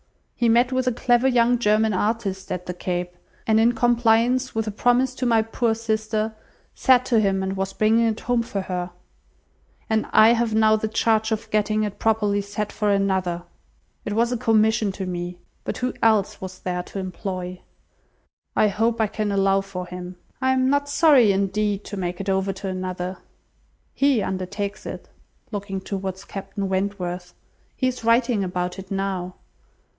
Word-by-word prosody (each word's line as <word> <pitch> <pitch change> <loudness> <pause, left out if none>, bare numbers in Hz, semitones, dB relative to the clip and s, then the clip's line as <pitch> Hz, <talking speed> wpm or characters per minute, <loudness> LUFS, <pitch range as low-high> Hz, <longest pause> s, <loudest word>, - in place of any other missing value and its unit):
He 240 -2 +2
met 240 +3 +4
with 255 0 0
a - - +4
clever 245 +1 +2
young 245 -1 +3
German 215 -1 +2
artist 200 -1 -2
at 180 0 -3
the 180 - -4
Cape, 180 0 -3 0.3
and 220 0 +3
in 235 +2 +4
compliance 240 +1 +2
with 220 0 0
a 215 - -3
promise 245 +4 +2
to 255 0 -2
my 225 -2 +4
poor 225 0 0
sister, 220 -1 -1 0.4
sat 255 -1 +4
to 235 -3 +3
him, 195 -2 +1
and 190 0 -2
was 195 0 -3
bringing 225 +3 +3
it 220 -1 -2
home 245 -1 +1
for 205 -4 -3
her; 180 -1 -3 1.0
and 220 -1 0
I 215 +1 +7
have 230 -2 +2
now 220 0 +5
the 215 0 -1
charge 220 0 +1
of 220 0 -3
getting 215 0 +1
it 205 -1 -4
properly 210 -2 +1
set 205 +1 -4
for 210 -1 -1
another! 190 -3 0 0.6
It 205 - -3
was 235 +2 +2
a 245 - 0
commission 220 -2 +2
to 190 0 -5
me! 175 -1 -4 0.3
But - - -4
who 250 0 -2
else 215 -3 +2
was 185 -1 -7
there 180 -1 -3
to 180 - -9
employ? 185 -1 -5 0.9
I 215 - +4
hope 225 +3 0
I 220 - +4
can 210 0 -2
allow 195 0 +3
for 195 -2 -6
him. 180 0 -8 0.3
I 260 0 +3
am 260 0 +2
not 285 0 +1
sorry, 285 -8 +5
indeed, 200 +1 0
to 205 - -7
make 180 -1 -3
it 195 0 -3
over 190 0 +1
to 195 +1 -6
another. 185 0 -4 0.7
He 275 -6 +2
undertakes 195 +2 -4
it;" - - -8 0.4
(looking 200 -2 -4
towards 190 0 -5
Captain 195 0 -5
Wentworth,) 185 -2 -3 0.4
"he 260 - -1
is 255 -2 -3
writing 230 -2 +3
about 180 0 -3
it 190 0 -10
now." 190 -2 -3
210 Hz, 175 wpm, -23 LUFS, 190-230 Hz, 1.0 s, I